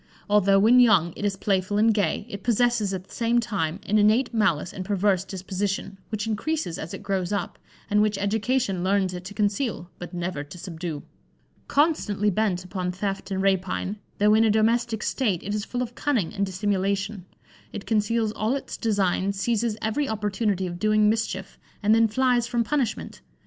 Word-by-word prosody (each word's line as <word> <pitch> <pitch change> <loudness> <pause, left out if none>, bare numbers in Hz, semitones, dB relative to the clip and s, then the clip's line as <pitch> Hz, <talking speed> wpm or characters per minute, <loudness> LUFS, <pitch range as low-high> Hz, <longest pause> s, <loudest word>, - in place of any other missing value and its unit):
Although 200 -1 +4
when 225 +5 +6
young 195 -9 +5
it - - -7
is 200 -1 0
playful 195 0 0
and 220 +1 +4
gay, 200 -1 0
it 200 -4 -7
possesses 235 -2 +2
at 185 -1 -4
the - - -17
same 235 +1 +2
time 195 -7 -2
an 215 +1 +2
innate 225 +5 +3
malice 190 -8 +1
and 190 - -5
perverse 195 -1 +1
disposition, 195 +1 -4
which 215 -1 -3
increases 225 - -2
as 160 - -6
it - - -10
grows 195 -2 -1
up, 205 - -3 0.3
and 210 -1 +3
which 210 -1 +1
education 205 -1 0
learns 190 -1 +1
it 180 0 -6
to 205 +2 -8
conceal, 205 -3 -1
but 175 - -7
never 175 -4 -3
to 145 +5 -11
subdue. 170 -4 -6 0.6
Constantly 220 - +2
bent 190 -3 0
upon 180 -1 -3
theft 195 +2 -4
and 190 -1 -1
rapine, 190 +1 0 0.2
though 210 +1 +4
in 220 +1 +5
a 225 - +4
domestic 220 +1 +1
state, 210 -10 0
it 205 - -3
is 210 0 -2
full 250 0 -2
of 240 -1 -7
cunning 240 - -1
and 200 -1 -1
dissimulation: 195 0 -1 0.4
it 205 - -7
conceals 220 0 +1
all 215 +4 -1
its 275 - -5
designs, 200 -3 0
seizes 225 +1 0
every 250 +6 0
opportunity 205 -2 -1
of 175 -1 -5
doing 215 0 +4
mischief, 200 -3 -3 0.2
and 210 +1 +4
then 225 0 +5
flies 245 +1 +2
from 235 -1 0
punishment. 255 -3 -2
205 Hz, 180 wpm, -25 LUFS, 190-225 Hz, 0.6 s, when